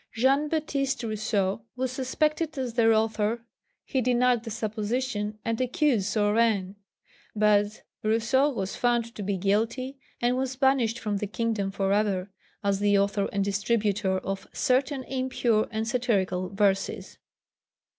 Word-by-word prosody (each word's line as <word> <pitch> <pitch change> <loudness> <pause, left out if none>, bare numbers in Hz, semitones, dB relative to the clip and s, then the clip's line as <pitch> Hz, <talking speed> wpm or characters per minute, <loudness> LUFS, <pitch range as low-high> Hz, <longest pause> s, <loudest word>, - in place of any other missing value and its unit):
Jean 270 +5 +3
Baptist 280 -4 -1
Rousseau 215 -2 -1
was 255 0 -2
suspected 305 +4 -1
as 255 -3 -2
their 225 -1 +4
author; 220 +1 +1 0.4
he 265 - 0
denied 245 -1 +2
the 230 - -6
supposition 215 0 -2
and 230 +1 -1
accused 255 - +1
Saurin; 205 -2 +1 0.6
but 210 0 +2 0.2
Rousseau 235 +6 +2
was 200 -8 -3
found 235 -1 +1
to - - -7
be 200 0 -1
guilty 225 +8 -1 0.2
and 240 +1 +2
was 260 0 -2
banished 260 -4 +2
from 210 -3 -2
the 210 - -3
kingdom 215 -2 -1
for 195 0 0
ever, 200 -2 0 0.3
as 200 -1 +1
the 205 0 +3
author 200 0 +1
and 200 -1 0
distributer 200 -1 0
of 195 +1 -4
"certain 260 +1 +1
impure 255 -4 0
and 220 0 -3
satirical 195 -7 0
verses." 195 0 0
225 Hz, 135 wpm, -27 LUFS, 205-255 Hz, 0.6 s, their